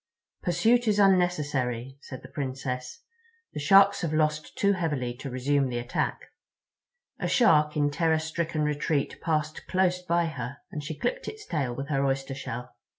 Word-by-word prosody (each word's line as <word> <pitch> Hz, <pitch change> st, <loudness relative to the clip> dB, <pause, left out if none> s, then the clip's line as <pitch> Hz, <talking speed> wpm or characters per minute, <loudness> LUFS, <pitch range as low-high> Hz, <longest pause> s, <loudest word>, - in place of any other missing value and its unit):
"Pursuit 225 Hz, +7 st, +2 dB
is 210 Hz, -1 st, +3 dB
unnecessary," 145 Hz, -, +1 dB
said 130 Hz, -, -9 dB
the -, -, -9 dB
Princess. 130 Hz, -2 st, -5 dB, 0.5 s
"The -, -, -4 dB
Sharks 195 Hz, +6 st, +6 dB
have 160 Hz, -3 st, -1 dB
lost 155 Hz, 0 st, 0 dB
too 200 Hz, 0 st, +3 dB
heavily 150 Hz, -9 st, -1 dB
to 135 Hz, -, -6 dB
resume 135 Hz, +2 st, +1 dB
the 120 Hz, -, -3 dB
attack." 120 Hz, +1 st, -2 dB, 1.0 s
A -, -, -1 dB
Shark 150 Hz, -11 st, +4 dB
in 145 Hz, -1 st, +2 dB
terror 160 Hz, +1 st, +2 dB
stricken 160 Hz, 0 st, -2 dB
retreat 150 Hz, 0 st, -1 dB
passed 155 Hz, -2 st, -2 dB
close 185 Hz, -1 st, +1 dB
by 170 Hz, -1 st, +1 dB
her, 140 Hz, -4 st, -5 dB
and 150 Hz, -5 st, -5 dB
she 155 Hz, +1 st, -5 dB
clipped -, -, -2 dB
its 435 Hz, -1 st, -7 dB
tail 135 Hz, -7 st, -2 dB
with 140 Hz, +2 st, -5 dB
her 140 Hz, -2 st, +1 dB
oyster 135 Hz, 0 st, -1 dB
shell. 125 Hz, -2 st, -6 dB
150 Hz, 160 wpm, -27 LUFS, 135-175 Hz, 1.0 s, Sharks